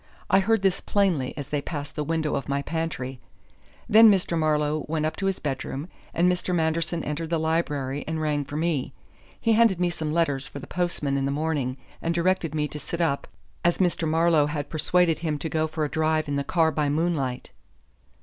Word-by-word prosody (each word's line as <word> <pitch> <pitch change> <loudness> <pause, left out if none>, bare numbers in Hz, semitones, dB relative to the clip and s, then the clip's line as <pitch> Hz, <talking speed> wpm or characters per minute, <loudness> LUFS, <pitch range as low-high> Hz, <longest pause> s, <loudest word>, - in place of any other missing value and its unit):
I 195 - +6
heard 220 +1 +2
this 195 -1 +2
plainly 175 -11 0
as 140 -3 -6
they 145 -1 -1
passed 145 -1 -6
the 150 - -1
window 155 0 -1
of 140 -1 -3
my 140 0 0
pantry. 145 -6 -3 0.7
Then 225 +1 +8
Mr. 190 -4 +2
Marlowe 155 -1 +1
went 155 0 -1
up 155 0 -1
to 195 - -1
his 195 - 0
bedroom 140 +2 -4 0.2
and 175 +2 +2
Mr. 180 0 0
Manderson 165 0 0
entered 155 +2 -3
the 165 - +1
library 150 -4 -1
and 160 0 -2
rang 150 -2 0
for 145 +1 -6
me. 155 -5 -1 0.5
He 230 - +2
handed 220 -5 +4
me 175 -1 +1
some 155 -3 -3
letters 145 -5 0
for - - -9
the 140 - -7
postman 175 -6 -1
in 135 - 0
the - - 0
morning 145 -3 -1 0.2
and 165 +1 -1
directed 170 -2 +1
me 150 -1 0
to 150 - -7
sit 170 +4 -5
up, 155 -5 0 0.4
as 175 0 +3
Mr. 175 -3 +1
Marlowe 160 -1 +3
had 150 -1 -4
persuaded 165 +1 +2
him 155 -3 -1
to 160 +3 -4
go 155 0 0
for 155 0 -2
a - - -3
drive 155 0 +1
in 145 - -1
the 140 - 0
car 160 +1 +2
by 150 -2 0
moonlight." 145 -5 -1
160 Hz, 205 wpm, -25 LUFS, 145-170 Hz, 0.7 s, Then